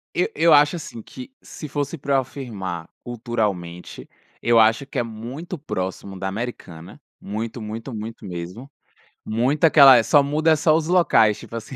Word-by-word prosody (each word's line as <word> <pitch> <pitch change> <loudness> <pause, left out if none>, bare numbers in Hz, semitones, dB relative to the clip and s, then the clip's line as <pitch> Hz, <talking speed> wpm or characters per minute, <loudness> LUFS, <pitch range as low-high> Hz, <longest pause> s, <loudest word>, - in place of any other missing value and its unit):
Eu - - +2
eu 165 -1 +4
acho 145 +3 +4
assim 120 -8 -8
que, 255 - -11
se 150 - -9
fosse 145 +3 -3
pra 140 0 -1
eu 135 - +4
afirmar 105 - -7 0.2
culturalmente, 105 -8 -4 0.3
eu 120 -1 +4
acho 115 +5 +3
que - - -6
é - - +2
muito 120 +10 -7
próximo 95 -7 -5
da 95 +1 -3
americana, 95 -6 -7 0.2
muito, 110 +3 -5
muito, 110 +4 -7
muito 110 +1 -7
mesmo, 90 +9 -7 0.5
muita 130 +9 +2
aquela 140 -5 +8
É, 115 - +3
só 145 +4 +4
muda 155 +3 +1
é - - +5
só 155 0 +3
os 160 0 0
locais, 165 - +3
tipo - - -10
assim, 115 +3 -7
120 Hz, 175 wpm, -22 LUFS, 105-145 Hz, 0.5 s, aquela